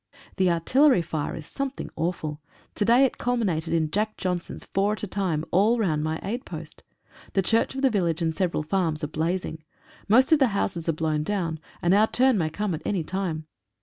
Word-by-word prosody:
The 185 Hz, -2 st, +3 dB
artillery 250 Hz, -, +4 dB
fire 155 Hz, -2 st, -3 dB
is 155 Hz, -, -8 dB
something 275 Hz, -, -5 dB
awful. 160 Hz, -2 st, -3 dB, 0.3 s
To -, -, -1 dB
day 240 Hz, +5 st, +5 dB
it 265 Hz, -, -3 dB
culminated 200 Hz, -10 st, 0 dB
in 160 Hz, -2 st, +1 dB
"Jack 215 Hz, +3 st, -1 dB
Johnsons," 180 Hz, -1 st, -3 dB
four 200 Hz, +2 st, +1 dB
at 215 Hz, -, -7 dB
a -, -, -1 dB
time, 180 Hz, -5 st, -1 dB
all 210 Hz, +6 st, +4 dB
round 160 Hz, -9 st, 0 dB
my 155 Hz, +1 st, -2 dB
aid 240 Hz, +6 st, -3 dB
post. -, -, -9 dB, 0.5 s
The 195 Hz, -, +2 dB
church 230 Hz, +6 st, +2 dB
of 270 Hz, -, -3 dB
the 265 Hz, -, +4 dB
village 175 Hz, -6 st, 0 dB
and 165 Hz, -2 st, 0 dB
several 175 Hz, -4 st, 0 dB
farms 160 Hz, -1 st, -1 dB
are 150 Hz, -, -4 dB
blazing. 160 Hz, 0 st, -2 dB, 0.4 s
Most 255 Hz, +8 st, +5 dB
of 315 Hz, -, +6 dB
the 265 Hz, -, +5 dB
houses 170 Hz, -4 st, -1 dB
are -, -, +3 dB
blown 155 Hz, -1 st, 0 dB
down, 165 Hz, -2 st, -2 dB, 0.2 s
and 175 Hz, +1 st, +4 dB
our 210 Hz, +2 st, +5 dB
turn 260 Hz, +1 st, +3 dB
may 160 Hz, -2 st, 0 dB
come 205 Hz, +3 st, -2 dB
at 160 Hz, -, -4 dB
any 190 Hz, -5 st, -1 dB
time. 170 Hz, -2 st, -3 dB
180 Hz, 205 wpm, -25 LUFS, 160-215 Hz, 0.5 s, of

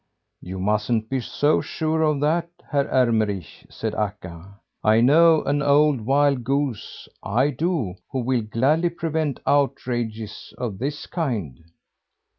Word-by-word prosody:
"You 95 Hz, +1 st, -7 dB
mustn't 105 Hz, +4 st, 0 dB
be 135 Hz, -, +1 dB
so 145 Hz, +4 st, +1 dB
sure 160 Hz, 0 st, -2 dB
of 150 Hz, -3 st, +1 dB
that, 165 Hz, +3 st, +1 dB, 0.2 s
Herr 140 Hz, -1 st, +1 dB
Ermenrich," 110 Hz, -, 0 dB
said -, -, -4 dB
Akka. 100 Hz, -2 st, -5 dB, 0.2 s
"I 110 Hz, +1 st, +4 dB
know 160 Hz, +6 st, +5 dB
an 145 Hz, +1 st, 0 dB
old 145 Hz, -2 st, +3 dB
wild 140 Hz, -2 st, +3 dB
goose, 135 Hz, -3 st, -3 dB
I 130 Hz, +8 st, +1 dB
do, 145 Hz, -, -1 dB, 0.2 s
who 130 Hz, -1 st, -1 dB
will 125 Hz, 0 st, 0 dB
gladly 135 Hz, +10 st, +1 dB
prevent 160 Hz, -4 st, -2 dB
outrages 120 Hz, -6 st, -1 dB
of 110 Hz, -6 st, -4 dB
this 145 Hz, +4 st, -3 dB
kind." 105 Hz, -, -4 dB
130 Hz, 130 wpm, -23 LUFS, 110-150 Hz, 0.2 s, know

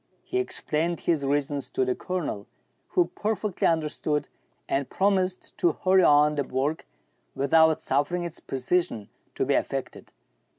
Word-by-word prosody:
He 375 Hz, -, -2 dB
explained 170 Hz, -, -1 dB
his 160 Hz, -5 st, +1 dB
reasons 140 Hz, 0 st, -1 dB
to 130 Hz, -, 0 dB
the 125 Hz, -, +1 dB
Colonel, 165 Hz, -, -4 dB, 0.4 s
who 360 Hz, -2 st, +1 dB
perfectly 210 Hz, -2 st, -1 dB
understood, 155 Hz, -2 st, -1 dB, 0.4 s
and 135 Hz, -1 st, -1 dB
promised 190 Hz, -2 st, 0 dB
to 170 Hz, -3 st, +3 dB
hurry 190 Hz, 0 st, +3 dB
on 150 Hz, -2 st, +5 dB
the 145 Hz, -1 st, 0 dB
work, 135 Hz, +4 st, -2 dB, 0.5 s
without 160 Hz, +4 st, +4 dB
suffering 145 Hz, +6 st, 0 dB
its 170 Hz, -2 st, -6 dB
pre 135 Hz, -, -5 dB
cision 130 Hz, -, 0 dB, 0.3 s
to -, -, 0 dB
be -, -, +1 dB
affected. -, -, -3 dB
155 Hz, 140 wpm, -26 LUFS, 140-180 Hz, 0.5 s, on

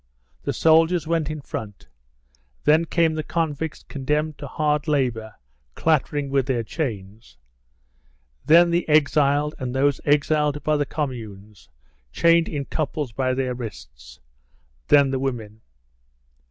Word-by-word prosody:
The -, -, -2 dB
soldiers 165 Hz, +1 st, +3 dB
went 160 Hz, -2 st, -1 dB
in 155 Hz, -1 st, -5 dB
front; 105 Hz, -6 st, -8 dB, 0.8 s
then 155 Hz, +2 st, +4 dB
came 165 Hz, -1 st, +1 dB
the 155 Hz, -, -2 dB
convicts 160 Hz, -1 st, -3 dB
condemned 150 Hz, +2 st, -2 dB
to 145 Hz, -, -6 dB
hard 150 Hz, +1 st, -1 dB
labour, 120 Hz, -8 st, -1 dB, 0.4 s
clattering 145 Hz, -2 st, 0 dB
with 135 Hz, -1 st, +1 dB
their 125 Hz, -4 st, 0 dB
chains; 110 Hz, -, -6 dB, 1.1 s
then 170 Hz, +2 st, +5 dB
the 170 Hz, -1 st, 0 dB
exiled 150 Hz, -1 st, +3 dB
and 130 Hz, -1 st, -4 dB
those 140 Hz, 0 st, +1 dB
exiled 150 Hz, 0 st, +1 dB
by 155 Hz, -1 st, +1 dB
the 145 Hz, -1 st, -1 dB
Communes, 110 Hz, -, -6 dB, 0.4 s
chained 170 Hz, -, +3 dB
in 145 Hz, -3 st, -4 dB
couples 150 Hz, -3 st, -3 dB
by 130 Hz, +2 st, -1 dB
their 130 Hz, -1 st, -1 dB
wrists; 95 Hz, -, -10 dB, 0.7 s
then 140 Hz, -2 st, +5 dB
the 135 Hz, -, -1 dB
women. 115 Hz, -5 st, -4 dB
145 Hz, 125 wpm, -23 LUFS, 125-155 Hz, 1.1 s, then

